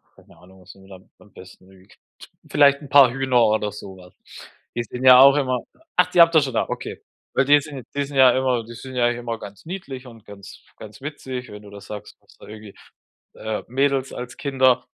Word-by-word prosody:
keine -, -, -21 dB
Ahnung, 95 Hz, +1 st, -19 dB
was 90 Hz, +1 st, -15 dB
ihr 95 Hz, 0 st, -19 dB
da 95 Hz, -1 st, -12 dB, 0.2 s
am 105 Hz, -, -21 dB
besten 95 Hz, 0 st, -16 dB
mögt? 95 Hz, 0 st, -21 dB, 0.5 s
Vielleicht 140 Hz, 0 st, +4 dB
'n 140 Hz, -, -12 dB
paar 135 Hz, -4 st, +6 dB
Hühner 130 Hz, -2 st, +1 dB
oder 105 Hz, -1 st, 0 dB
so 95 Hz, -1 st, -10 dB
was. 90 Hz, 0 st, -17 dB, 0.6 s
Die 120 Hz, -, -2 dB
sind 125 Hz, +2 st, -7 dB
ja 125 Hz, 0 st, +9 dB
auch 135 Hz, +1 st, +7 dB
immer 130 Hz, -3 st, -1 dB, 0.3 s
ach, 180 Hz, -, +3 dB
die 175 Hz, -, +1 dB
habt 165 Hz, 0 st, +5 dB
ihr 155 Hz, -, +6 dB
schon 135 Hz, -3 st, -4 dB
da? -, -, -1 dB
Okay. -, -, -7 dB, 0.3 s
Weil 135 Hz, -, +2 dB
die 145 Hz, +1 st, +5 dB
sind 140 Hz, -5 st, -10 dB
die 140 Hz, -, 0 dB
sind 140 Hz, 0 st, -7 dB
ja 130 Hz, -1 st, +7 dB
immer 130 Hz, -3 st, 0 dB
die 115 Hz, -, -11 dB
sind 130 Hz, +3 st, -10 dB
ja 120 Hz, -1 st, +2 dB
immer 120 Hz, -1 st, -5 dB
ganz 100 Hz, +5 st, -12 dB
niedlich 150 Hz, -8 st, -8 dB
und 115 Hz, -2 st, -15 dB
ganz 100 Hz, -1 st, -13 dB
ganz 110 Hz, +4 st, -13 dB
witzig. 130 Hz, -4 st, -7 dB
Wenn 105 Hz, 0 st, -11 dB
du 100 Hz, -, -13 dB
das 100 Hz, 0 st, -13 dB
sagst, 105 Hz, -2 st, -10 dB
du -, -, -35 dB
hast -, -, -24 dB
da -, -, -12 dB
irgendwie, 105 Hz, -1 st, -12 dB, 0.6 s
äh, 110 Hz, -1 st, -5 dB
Mädels 135 Hz, +1 st, -1 dB
als 125 Hz, 0 st, -8 dB
Kinder, 130 Hz, -3 st, +1 dB
125 Hz, 225 wpm, -21 LUFS, 105-135 Hz, 0.6 s, ja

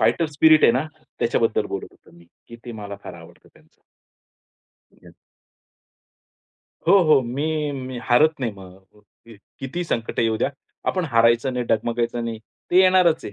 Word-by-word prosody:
Fighter 165 Hz, -, +2 dB
spirit 155 Hz, +1 st, +4 dB
आहे 115 Hz, -, +6 dB
ना, 135 Hz, +5 st, -1 dB, 0.3 s
त्याच्याबद्दल -, -, 0 dB
बोलत -, -, -5 dB
होतो -, -, -24 dB
मी. 85 Hz, -, -18 dB, 0.2 s
की 115 Hz, -, -11 dB
ते 120 Hz, -, -7 dB
मला 100 Hz, -2 st, -8 dB
फार 90 Hz, -, -8 dB
आवडतं 85 Hz, -1 st, -16 dB
त्यांचं. -, -, -26 dB, 1.1 s
ठीक -, -, -28 dB
आहे. -, -, -15 dB, 1.8 s
हो, 200 Hz, -, +7 dB
हो. 155 Hz, -4 st, +4 dB
मी 150 Hz, +5 st, -2 dB
मी 130 Hz, -2 st, -6 dB
हारत 155 Hz, +6 st, +4 dB
नाही 115 Hz, -4 st, -2 dB
मग. 95 Hz, +2 st, -16 dB, 0.6 s
किती 135 Hz, +7 st, -4 dB
संकट 115 Hz, -8 st, -4 dB
येऊ 115 Hz, -1 st, +1 dB
द्या -, -, 0 dB, 0.4 s
आपण 185 Hz, -2 st, -1 dB
हारायचं 115 Hz, -1 st, +2 dB
नाही, 125 Hz, -1 st, -2 dB
डगमगायचं 120 Hz, +1 st, -1 dB
नाही, 115 Hz, -1 st, -5 dB, 0.3 s
ते 180 Hz, -, +4 dB
येणारच 185 Hz, -3 st, +3 dB
आहे. 100 Hz, -, -7 dB
125 Hz, 160 wpm, -22 LUFS, 115-155 Hz, 1.8 s, हो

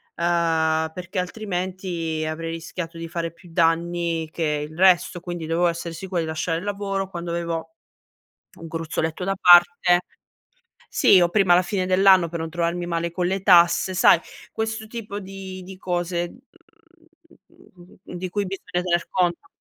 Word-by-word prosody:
ehm, 160 Hz, -2 st, +1 dB
perché 180 Hz, +2 st, -5 dB
altrimenti 180 Hz, -4 st, -3 dB
avrei 165 Hz, +1 st, -4 dB
rischiato 165 Hz, +1 st, -6 dB
di 165 Hz, 0 st, -6 dB
fare 165 Hz, 0 st, -4 dB
più 170 Hz, +2 st, -18 dB
danni 165 Hz, 0 st, 0 dB
che 150 Hz, -2 st, -2 dB
il 155 Hz, -, -13 dB
resto, 180 Hz, -1 st, +3 dB
quindi 175 Hz, -2 st, -5 dB
dovevo 165 Hz, +2 st, +1 dB
essere 170 Hz, 0 st, -3 dB
sicuro 180 Hz, +1 st, -4 dB
di 165 Hz, -, -2 dB
lasciare 160 Hz, +1 st, -2 dB
il 170 Hz, -, -6 dB
lavoro 195 Hz, -1 st, -2 dB
quando 170 Hz, -2 st, -5 dB
avevo 165 Hz, -1 st, -4 dB, 0.8 s
un 165 Hz, -, -8 dB
gruzzoletto 160 Hz, +1 st, -3 dB
da 195 Hz, +2 st, 0 dB
parte 175 Hz, 0 st, +6 dB, 0.9 s
Sì 190 Hz, -, +6 dB
o 175 Hz, -, +4 dB
prima 190 Hz, -2 st, +4 dB
la 180 Hz, -, +5 dB
fine 185 Hz, 0 st, -2 dB
dell'anno 185 Hz, -1 st, +5 dB
per 170 Hz, +1 st, -5 dB
non 160 Hz, 0 st, -4 dB
trovarmi 170 Hz, +1 st, -2 dB
male 170 Hz, 0 st, -2 dB
con 175 Hz, +1 st, -1 dB
le 190 Hz, +1 st, -1 dB
tasse, 180 Hz, 0 st, +5 dB
sai 180 Hz, -, +6 dB, 0.4 s
questo 220 Hz, 0 st, -3 dB
tipo 215 Hz, -3 st, -6 dB
di 190 Hz, -1 st, -8 dB
di 190 Hz, +1 st, -10 dB
cose, 175 Hz, -1 st, -2 dB, 1.2 s
mhmm, 175 Hz, -1 st, -20 dB, 0.2 s
di 185 Hz, +1 st, -4 dB
cui 205 Hz, +3 st, -2 dB
bisogna 180 Hz, -1 st, -4 dB
tener 175 Hz, -1 st, 0 dB
conto. 175 Hz, -2 st, 0 dB
175 Hz, 155 wpm, -23 LUFS, 165-185 Hz, 1.2 s, parte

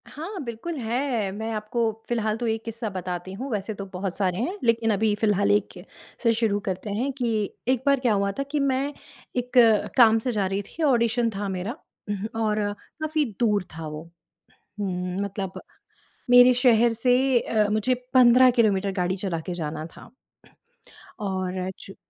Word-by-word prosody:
हाँ, 345 Hz, +6 st, -7 dB
बिल्कुल 235 Hz, +8 st, -5 dB
है। 235 Hz, -3 st, -1 dB
मैं 220 Hz, +3 st, -4 dB
आपको 215 Hz, +2 st, -3 dB, 0.3 s
फ़िलहाल 220 Hz, -2 st, 0 dB
तो 240 Hz, 0 st, -2 dB
एक 225 Hz, 0 st, -1 dB
किस्सा 230 Hz, -1 st, -4 dB
बताती 185 Hz, -1 st, -5 dB
हूँ, 255 Hz, +8 st, -5 dB
वैसे 210 Hz, 0 st, -2 dB
तो 200 Hz, -1 st, -7 dB
बहुत 190 Hz, -1 st, -4 dB
सारे 185 Hz, -3 st, 0 dB
हैं 335 Hz, -, -2 dB
लेकिन 230 Hz, -1 st, +2 dB
अभी 210 Hz, +1 st, +2 dB
फिलहाल 205 Hz, -2 st, +2 dB
एक 205 Hz, -1 st, +1 dB, 0.5 s
से 230 Hz, -1 st, +4 dB
शुरू 220 Hz, -3 st, +1 dB
करते 190 Hz, +2 st, -3 dB
हैं 255 Hz, +6 st, -1 dB
कि 240 Hz, -3 st, 0 dB, 0.3 s
एक 260 Hz, -1 st, +1 dB
बार 280 Hz, -1 st, +4 dB
क्या 245 Hz, -4 st, +2 dB
हुआ 200 Hz, 0 st, +1 dB
था -, -, +1 dB
कि 300 Hz, -, 0 dB
मैं 275 Hz, +1 st, 0 dB, 0.4 s
एक 245 Hz, 0 st, -2 dB, 0.5 s
काम 225 Hz, -2 st, +7 dB
से 250 Hz, +3 st, -2 dB
जा 210 Hz, -4 st, 0 dB
रही 195 Hz, +1 st, -1 dB
थी। 310 Hz, +11 st, -7 dB
ऑडिशन 235 Hz, -4 st, +2 dB
था 200 Hz, +1 st, -3 dB
मेरा 190 Hz, -, -4 dB, 0.6 s
और 215 Hz, -1 st, +1 dB, 0.4 s
काफ़ी 310 Hz, -1 st, 0 dB
दूर 210 Hz, -5 st, +2 dB
था 160 Hz, -1 st, -5 dB
वो। 155 Hz, +1 st, -7 dB, 0.8 s
हुँ, 180 Hz, -2 st, -3 dB
मतलब 195 Hz, -1 st, -5 dB, 0.7 s
मेरे 245 Hz, 0 st, +8 dB
शहर 240 Hz, -2 st, +4 dB
से 250 Hz, +2 st, +3 dB
अ, 215 Hz, -2 st, +1 dB
मुझे 215 Hz, +4 st, +2 dB, 0.2 s
15 255 Hz, 0 st, +7 dB
किलोमीटर 205 Hz, -5 st, +2 dB
गाड़ी 185 Hz, -1 st, -1 dB
चला 185 Hz, -3 st, -3 dB
के 180 Hz, -, -3 dB
जाना 155 Hz, -2 st, -4 dB
था। -, -, -13 dB, 1.1 s
और 185 Hz, -2 st, -2 dB
चूँ 195 Hz, -, -11 dB
220 Hz, 170 wpm, -25 LUFS, 195-245 Hz, 1.1 s, मेरे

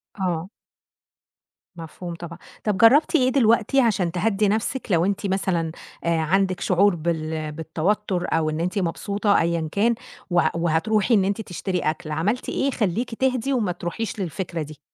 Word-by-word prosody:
آه. 180 Hz, -3 st, -2 dB, 1.3 s
مفهوم 170 Hz, +1 st, -7 dB
طبعًا. 170 Hz, 0 st, -8 dB, 0.3 s
طب 210 Hz, -3 st, 0 dB
جرّبتِ 275 Hz, -, +5 dB
إيه 255 Hz, -4 st, +4 dB
دلوقتي 235 Hz, 0 st, +3 dB
عشان 195 Hz, -8 st, +1 dB
تهدّي 200 Hz, +3 st, +1 dB
نفسك 220 Hz, +5 st, -1 dB
لو 170 Hz, -1 st, +3 dB
أنتِ 200 Hz, +1 st, -1 dB
مثلًا 185 Hz, -4 st, 0 dB, 0.3 s
آآ 170 Hz, -1 st, +1 dB
عندك 185 Hz, +3 st, +1 dB
شعور 190 Hz, +1 st, +3 dB
بال 160 Hz, -1 st, -2 dB
بالتوتر، 175 Hz, +5 st, -1 dB
أو 160 Hz, -1 st, +1 dB
إن 155 Hz, 0 st, -3 dB
أنتِ 180 Hz, +4 st, -1 dB
مبسوطة 200 Hz, +3 st, +1 dB
أيًا 165 Hz, -1 st, -1 dB
كان، 230 Hz, +5 st, +2 dB, 0.3 s
و 175 Hz, -1 st, +3 dB
وهتروحي 175 Hz, +7 st, +1 dB
إن 200 Hz, -4 st, +4 dB
أنتِ 200 Hz, +3 st, -1 dB
تشتري 185 Hz, -2 st, -3 dB
أكل، 155 Hz, -1 st, -2 dB
عملتِ 195 Hz, +11 st, -1 dB
إيه 270 Hz, -, 0 dB
يخلّيكِ 230 Hz, -1 st, -1 dB
تهدي 260 Hz, +1 st, 0 dB
وما 220 Hz, -8 st, +1 dB
تروحيش 180 Hz, +5 st, -4 dB
للفكرة 175 Hz, -1 st, -3 dB
دي؟ 150 Hz, -2 st, -8 dB
185 Hz, 155 wpm, -23 LUFS, 165-215 Hz, 1.3 s, جرّبتِ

